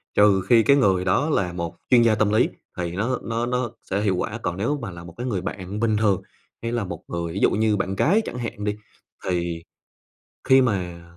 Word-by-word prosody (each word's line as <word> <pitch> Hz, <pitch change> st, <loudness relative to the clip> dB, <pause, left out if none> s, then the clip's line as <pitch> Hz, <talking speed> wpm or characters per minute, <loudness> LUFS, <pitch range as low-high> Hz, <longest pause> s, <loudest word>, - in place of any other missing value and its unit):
trừ 105 Hz, -2 st, +5 dB
khi 115 Hz, -2 st, +6 dB
cái 140 Hz, +3 st, +5 dB
người 95 Hz, -8 st, +3 dB
đó 95 Hz, +12 st, +2 dB
là 90 Hz, -, 0 dB
một 85 Hz, -1 st, -4 dB
chuyên 125 Hz, -2 st, +6 dB
gia 115 Hz, -2 st, +4 dB
tâm 110 Hz, -1 st, +2 dB
lý 110 Hz, -, +3 dB, 0.3 s
thì 85 Hz, -1 st, -2 dB
nó 115 Hz, +8 st, -1 dB
nó 115 Hz, +1 st, -1 dB
nó 125 Hz, -1 st, -1 dB, 0.2 s
sẽ 100 Hz, +2 st, 0 dB
hiệu 100 Hz, -3 st, +1 dB
quả. 100 Hz, +5 st, -3 dB
Còn 90 Hz, -3 st, -2 dB
nếu 120 Hz, +9 st, 0 dB
mà 115 Hz, -, -5 dB
là 85 Hz, -1 st, -10 dB
một 85 Hz, -1 st, -11 dB
cái 125 Hz, +2 st, -4 dB
người 100 Hz, -7 st, -1 dB
bạn 95 Hz, +2 st, -5 dB
bình 110 Hz, -1 st, +2 dB
thường, 105 Hz, -3 st, +2 dB, 0.4 s
hay 115 Hz, -, -3 dB
là 120 Hz, -2 st, -1 dB
một 85 Hz, -3 st, -7 dB
người 85 Hz, -1 st, -4 dB
ví 100 Hz, -, -3 dB
dụ -, -, +4 dB
như 110 Hz, 0 st, +2 dB
bạn 95 Hz, 0 st, -2 dB
gái 195 Hz, -, +3 dB
chẳng -, -, -5 dB
hạn 115 Hz, -4 st, -5 dB
đi, 105 Hz, 0 st, -1 dB, 0.5 s
thì 85 Hz, -2 st, -2 dB, 0.8 s
khi 130 Hz, 0 st, +6 dB
mà 90 Hz, -8 st, -1 dB
105 Hz, 230 wpm, -23 LUFS, 90-115 Hz, 0.8 s, khi